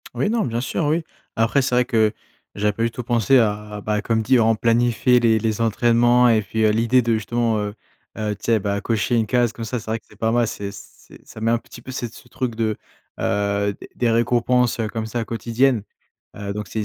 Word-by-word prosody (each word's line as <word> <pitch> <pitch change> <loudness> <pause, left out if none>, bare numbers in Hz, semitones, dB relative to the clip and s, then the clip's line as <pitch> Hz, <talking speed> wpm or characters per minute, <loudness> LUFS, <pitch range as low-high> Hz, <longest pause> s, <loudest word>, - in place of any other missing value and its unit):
Oui, 205 - 0
non, 230 -1 +1
bien 115 -1 -2
sûr, 130 +6 -2
oui. 160 +3 +1 0.3
Après, 115 +5 +2
c'est 125 -1 0
vrai 125 0 +3
que 110 -4 +2 0.4
j'avais 105 +1 +1
pas 115 - -5
du 115 - +2
tout 125 - -6
pensé 120 +2 +3
à 105 -2 0
à 105 - -6
bah 105 0 -1
comme 110 +1 0
dit, 130 +2 +4
on 115 0 +3
planifie 120 +2 +3
les 115 -2 +3
les 110 0 -1
entraînements 120 +2 +4
et 110 -2 +4
puis, 110 +2 -2
heu, 105 - +4
l'idée 115 +3 +3
de 115 0 +1
justement, 115 0 0
heu 105 0 -4 0.4
heu, 105 -1 -2
tu 105 - -12
sais 115 -2 +3
bah, 100 0 -2
cocher 115 +1 0
une 110 -2 +1
case, 120 -1 +1
comme 115 - -6
ça, 120 +3 -3
c'est 115 - -12
vrai 115 - -1
que - - -38
c'est - - -17
pas 110 0 0
mal. 120 0 +2
C'est 100 -1 -5
c'est - - -15
ça 110 - -11
met 115 +1 +2
un 120 - +2
petit 120 - -14
peu 130 - -8
cet 120 -3 -5
ce - - -15
truc 125 -3 -4
de, 110 -1 0 0.4
heu, 100 0 0
des - - -10
des 120 - +1
récompenses, 120 +1 +2
heu, 110 - 0
comme 110 0 -4
ça 115 +1 -3
quotidiennes. 115 +1 +1 0.5
Heu 100 -1 -4
donc 105 -1 -6
c'est 110 +4 -3
115 Hz, 240 wpm, -21 LUFS, 110-120 Hz, 0.5 s, dit